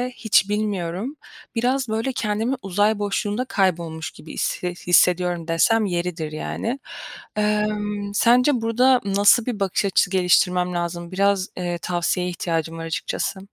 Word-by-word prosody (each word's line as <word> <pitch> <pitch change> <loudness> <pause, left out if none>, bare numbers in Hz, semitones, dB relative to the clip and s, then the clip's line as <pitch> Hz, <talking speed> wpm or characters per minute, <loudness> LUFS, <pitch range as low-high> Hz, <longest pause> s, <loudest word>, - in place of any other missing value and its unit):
hiç 205 -3 +2
bilmiyorum. 205 - -2 0.4
Biraz, 250 +2 0
böyle, 225 +4 -1
"kendimi 225 +3 -1
uzay 205 +3 +1
boşluğunda 205 +3 -1
kaybolmuş 170 -7 -1
gibi 155 - -12
hisse 180 - -2
hissediyorum.” 175 -1 +2
dersem 215 +7 +3
yeridir 175 -4 -3
yani. 230 - -4 0.6
Emm, 210 -1 -1
sence 245 +4 +4
burda 245 +3 +3
nasıl 200 +3 +4
bir 240 -5 -3
bakış 195 0 0
açısı 195 -1 +2
geliştirmem 180 -1 +2
lazım? 170 0 -4
Biraz, 195 0 +1
eee, 175 -1 -2
tavsiyeye 180 +1 -1
ihtiyacım 165 -2 -3
var 165 - -5
açıkçası. 165 +3 -3
195 Hz, 130 wpm, -22 LUFS, 175-215 Hz, 0.6 s, sence